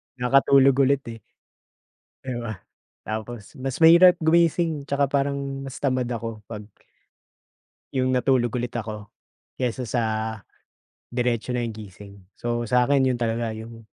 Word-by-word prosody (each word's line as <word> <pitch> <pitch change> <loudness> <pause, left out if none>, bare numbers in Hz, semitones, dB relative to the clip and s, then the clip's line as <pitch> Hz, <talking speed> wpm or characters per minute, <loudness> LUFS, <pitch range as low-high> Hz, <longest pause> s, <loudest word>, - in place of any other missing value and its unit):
nakatulog 135 +1 +4
ulit, 140 0 +1
eh, 115 - -10 1.0
'di 130 -2 -5
ba? 110 -5 -6 0.4
Tapos, 110 0 -6
mas 135 0 -3
mahirap 175 +2 +8
gumising, 165 -2 +1
'tsaka 140 0 +1
parang 140 0 +1 0.2
mas 135 -1 -7
tamad 130 -3 -1
ako 115 -2 -5
pag 105 -2 -7 1.3
'yong 130 -1 +1
natulog 125 -2 +1
ulit 120 -1 -3
ako 105 -2 -6 0.5
kaysa 125 0 -2
sa, 120 +2 0 1.1
diretso 120 -1 -1
na 125 - -1
'yong 115 - -6
gising. 100 -1 -11 0.2
So 120 0 -2
sa'kin, 125 +4 +3
'yon 130 -2 +1
talaga 115 -1 -1
'yong, 115 +1 -10
125 Hz, 130 wpm, -24 LUFS, 115-135 Hz, 1.3 s, mahirap